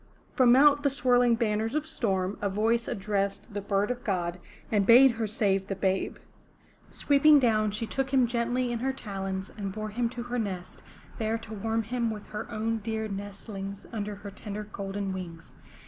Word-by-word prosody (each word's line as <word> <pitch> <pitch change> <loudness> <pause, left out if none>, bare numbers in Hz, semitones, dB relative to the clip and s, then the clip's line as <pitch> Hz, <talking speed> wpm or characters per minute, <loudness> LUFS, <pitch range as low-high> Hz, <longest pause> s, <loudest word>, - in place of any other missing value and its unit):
From 250 -2 +6
out 290 +1 +6
the 285 - +3
swirling 245 -2 +3
banners 225 +1 0
of 305 0 0
storm, 195 -10 -1
a 200 - 0
voice 225 +4 +1
addressed 200 +2 -2
the 205 - -3
Bird 200 +2 0
of 245 0 -5
God 180 -3 -1 0.3
and 210 -2 +3
bade 255 +3 +8
her 230 -1 -2
save 195 -3 +1
the 195 - -2
babe. 190 0 -1 0.7
Sweeping 295 +1 +5
down 220 -5 +3
she 210 +3 -3
took 270 +4 -2
him 260 -2 +4
gently 240 +1 0
in 235 - -2
her 265 +2 -1
talons 195 -5 -5
and 200 -2 -4
bore 215 +2 -4
him 235 +2 -1
to 240 0 -6
her 245 +1 -3
nest, 185 -5 -4 0.4
there 220 0 0
to 225 -1 -10
warm 225 +2 -1
him 235 +1 -1
with 210 -2 -7
her 210 - -5
own 225 0 -1
dear 220 +1 -3
nestlings 200 0 -6
under 210 -2 -3
her 200 0 -9
tender 210 +1 -6
golden 200 -1 -4
wings. 170 -3 -8
215 Hz, 185 wpm, -28 LUFS, 200-240 Hz, 0.7 s, bade